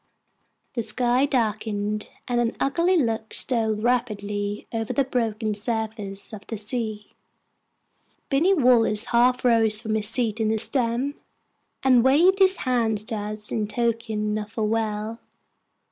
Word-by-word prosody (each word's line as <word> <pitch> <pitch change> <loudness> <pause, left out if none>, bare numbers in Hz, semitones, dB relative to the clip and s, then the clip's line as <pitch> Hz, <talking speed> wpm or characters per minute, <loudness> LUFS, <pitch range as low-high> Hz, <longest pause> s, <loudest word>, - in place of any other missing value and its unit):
The 235 - -2
sky 245 +4 +2
darkened, 215 -4 -2 0.2
and 240 -1 +1
an 230 -1 -1
ugly 335 +7 +1
look 225 -6 -1
stole 225 -4 +1
rapidly 210 -3 -2
over 225 -1 -2
the 275 - +2
broken 225 -4 -2
surface 215 -2 -3
of 210 - -7
the 225 - -5
sea. 215 -1 -4 1.2
Binny 330 +8 +2
Wallace 235 - +4
half 250 +1 +2
rose 225 -3 +4
from 220 -1 -4
his 215 -1 +1
seat 225 -2 0
in 220 - +1
the 220 - +1
stem, 245 +3 0 0.7
and 255 -3 +5
waved 335 +9 +4
his 380 0 +5
hand 235 -4 +1
to 225 - -2
us 210 0 -2
in 215 -2 -1
token 220 -2 -2
of 210 0 -8
farewell. 220 0 -2
225 Hz, 135 wpm, -24 LUFS, 215-245 Hz, 1.2 s, and